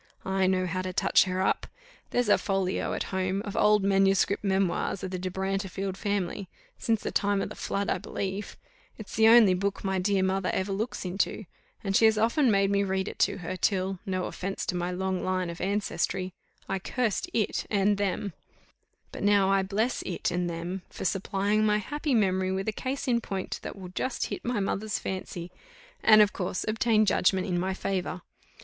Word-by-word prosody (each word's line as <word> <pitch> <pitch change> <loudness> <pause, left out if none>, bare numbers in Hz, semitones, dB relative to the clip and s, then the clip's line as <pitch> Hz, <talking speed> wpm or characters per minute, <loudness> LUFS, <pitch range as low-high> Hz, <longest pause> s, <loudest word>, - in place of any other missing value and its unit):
I 190 0 +1
know 185 0 +2
how 185 +1 -2
to 185 0 -4
touch - - +4
her 185 0 -1
up. - - 0 0.4
There's 245 -2 +1
a 205 - +5
folio, 195 -2 -1
at - - -1
home, 190 +1 0
of 205 - -5
old 210 -1 +4
Manuscript 195 0 +3
Memoirs 195 -1 0
of 185 - -4
the 185 - -3
De 185 +1 -3
Brantefield 190 0 -2
family, 200 -2 -2 0.3
since 225 -3 0
the - - -2
time 205 0 +1
of - - -2
the - - -8
flood, 200 0 -2
I - - 0
believe: 195 +1 -4 0.4
it's 215 - -8
the 220 +1 +5
only 225 -4 +8
book 195 +2 -2
my 190 -1 0
dear 195 0 +2
mother 190 0 0
ever 190 +1 -1
looks 210 +2 -3
into; 195 +3 -1 0.4
and 195 -1 -1
she 225 - +6
has 220 -1 +5
often 235 +5 +3
made 195 -1 +3
me 200 0 +2
read 190 0 -1
it - - -7
to - - +2
her, 185 - -3
till 190 0 0
no 185 -3 -2
offence 195 +1 -4
to 180 - -2
my 175 0 -1
long 185 0 -2
line 185 -2 -1
of 170 - -9
ancestry 190 -2 -1 0.3
I 195 - -1
cursed 245 - -1
it 220 - -1
and 200 0 +2
them; 200 -1 -1 0.8
but - - -7
now 200 -1 +4
I 195 0 +4
bless 210 +6 -1
it 180 - -2
and 175 0 -1
them 170 +3 -4
for - - -7
supplying 200 +3 +1
my 210 -1 +3
happy 290 - -1
memory 190 -3 +2
with 190 +1 -2
a - - +2
case 265 +6 -4
in 235 -2 +2
point, 195 -4 -4
that - - -6
will 185 -3 -9
just 245 +8 -2
hit - - -5
my 240 -2 -1
mother's 205 +2 -1
fancy, 180 -2 -5 0.5
and, 215 -1 +8
of 205 - -1
course, 185 -1 -3
obtain 215 0 +3
judgment 190 -1 +2
in 180 -3 0
my 190 +1 -1
favour. 185 -2 -3
195 Hz, 200 wpm, -28 LUFS, 185-210 Hz, 0.8 s, only